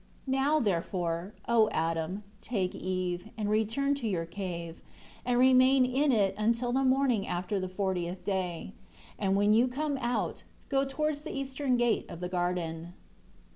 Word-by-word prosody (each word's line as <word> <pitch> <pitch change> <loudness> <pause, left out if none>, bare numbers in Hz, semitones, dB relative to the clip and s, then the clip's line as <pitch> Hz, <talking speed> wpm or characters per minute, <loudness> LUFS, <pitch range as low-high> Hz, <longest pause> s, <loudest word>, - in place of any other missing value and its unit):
11 265 0 +1
Now, 305 +2 +3
therefore, 175 - -1
O 225 -2 +4
Adam, 165 +2 -1 0.2
take 195 -6 -1
Eve, 185 +1 -3
and 210 -1 -1
return 225 +7 +1
to 275 -5 -3
your 175 -5 -1
cave, 170 -2 -6 0.4
and 245 0 +1
remain 255 +1 +6
in 270 +3 +2
it 205 -5 +3
until 230 +3 +1
the 265 +2 +2
morning 260 -5 +2
after 180 +3 -2
the 185 0 -3
fortieth 185 -2 -2
day. 185 -2 -2 0.5
And 195 -2 +1
when 205 +1 +4
you 235 +3 +5
come 280 +2 -2
out, 240 -1 -1 0.3
go 275 -1 +2
towards 295 +2 -1
the 310 -2 -6
eastern 270 -1 0
gate 240 -1 +1
of 170 - -8
the 180 0 -4
garden." 175 -2 -2
210 Hz, 160 wpm, -30 LUFS, 180-260 Hz, 0.5 s, remain